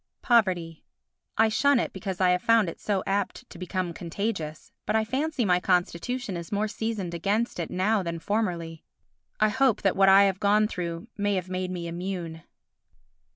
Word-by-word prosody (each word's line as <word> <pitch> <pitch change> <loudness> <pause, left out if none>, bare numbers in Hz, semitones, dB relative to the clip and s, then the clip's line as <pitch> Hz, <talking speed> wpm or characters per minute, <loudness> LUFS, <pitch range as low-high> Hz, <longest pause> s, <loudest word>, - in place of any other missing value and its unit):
Poverty 180 -9 +2 0.5
I 225 - +5
shun 280 +4 +3
it - - -2
because 190 -4 -5
I 185 -1 +4
have 180 0 +1
found 230 -2 +4
it - - -9
so 200 -3 -1
apt 200 0 -2
to 170 - -11
become 185 -1 -3
contagious; 165 -3 -4 0.2
but 210 - +1
I 220 0 +2
fancy 270 +2 -1
my 180 -2 +3
constitution 190 +6 -1
is 170 -1 -7
more 210 +1 0
seasoned 210 -5 -3
against 200 +6 -1
it 170 - -3
now 205 +3 +1
than 170 -2 -4
formerly. 170 -4 -2 0.6
I 215 - +4
hope 260 +1 +2
that 195 - +2
what 195 0 +5
I 195 +1 +8
have 195 -1 +1
gone 210 +1 +3
through 170 -1 -5
may 205 0 +1
have 185 -1 -3
made 185 0 -2
me 180 -2 -4
immune. 170 -2 -5
195 Hz, 180 wpm, -26 LUFS, 175-215 Hz, 0.6 s, I